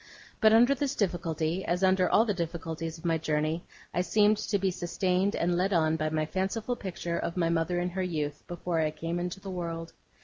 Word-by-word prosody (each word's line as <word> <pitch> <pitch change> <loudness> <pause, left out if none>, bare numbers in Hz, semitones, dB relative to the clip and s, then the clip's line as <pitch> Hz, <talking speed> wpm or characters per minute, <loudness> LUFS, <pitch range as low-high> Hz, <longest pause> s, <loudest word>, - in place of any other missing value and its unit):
But 220 -1 +6
under 240 +5 +6
this 280 +1 -2
difficulty, 170 - -1
as 180 +2 -1
under 185 -1 +4
all 225 - +5
the 210 - +1
other - - -11
difficulties 165 0 -5
of 160 - -13
my 165 -1 +2
journey, 155 +1 0 0.3
I 180 - +1
seemed 210 +3 +3
to 205 0 0
be 190 -1 +1
sustained 185 +2 0
and 175 +1 +1
led 190 +3 +1
on 160 -2 +3
by 155 -1 -1
my 155 0 0
fanciful 195 +8 -2
picture 175 -5 -4
of 170 - -3
my 165 -2 +2
mother 170 +1 +1
in 175 0 -1
her 190 +1 -2
youth, 150 -5 -2
before 175 -1 -2
I 155 -1 +2
came 165 +3 -3
into 180 +2 -3
the 195 0 -7
world. 165 -2 -4
175 Hz, 215 wpm, -29 LUFS, 165-190 Hz, 0.3 s, But